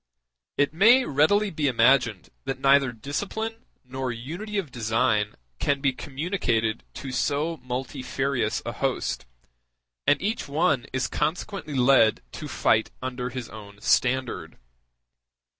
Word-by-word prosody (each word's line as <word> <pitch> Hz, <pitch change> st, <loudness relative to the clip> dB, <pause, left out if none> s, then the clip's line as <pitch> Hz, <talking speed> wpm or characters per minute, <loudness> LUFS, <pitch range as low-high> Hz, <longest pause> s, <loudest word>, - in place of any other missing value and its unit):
It 145 Hz, +1 st, +2 dB
may 235 Hz, +9 st, +6 dB
readily 195 Hz, +9 st, +3 dB
be 150 Hz, -2 st, 0 dB
imagined 120 Hz, -4 st, +3 dB, 0.2 s
that 135 Hz, 0 st, -3 dB
neither 135 Hz, -1 st, +4 dB
discipline 205 Hz, -, -4 dB, 0.2 s
nor 130 Hz, 0 st, -3 dB
unity 170 Hz, -, -5 dB
of 170 Hz, -9 st, -2 dB
design 110 Hz, -2 st, +1 dB, 0.2 s
can 140 Hz, -1 st, +1 dB
be 135 Hz, -1 st, +1 dB
communicated 130 Hz, -, -1 dB
to 135 Hz, -, -6 dB
so 145 Hz, +6 st, 0 dB
multifarious 130 Hz, 0 st, -2 dB
a -, -, -2 dB
host, -, -, -2 dB, 0.8 s
and 145 Hz, 0 st, +5 dB
each 215 Hz, +3 st, -2 dB
one 145 Hz, -2 st, +1 dB
is 130 Hz, 0 st, 0 dB
consequently 155 Hz, +1 st, -3 dB
led 125 Hz, -, +4 dB
to -, -, -7 dB
fight -, -, +2 dB
under 125 Hz, -1 st, -3 dB
his 125 Hz, -1 st, -6 dB
own 105 Hz, -2 st, -11 dB
standard. 130 Hz, +1 st, +1 dB
135 Hz, 125 wpm, -26 LUFS, 125-155 Hz, 0.8 s, may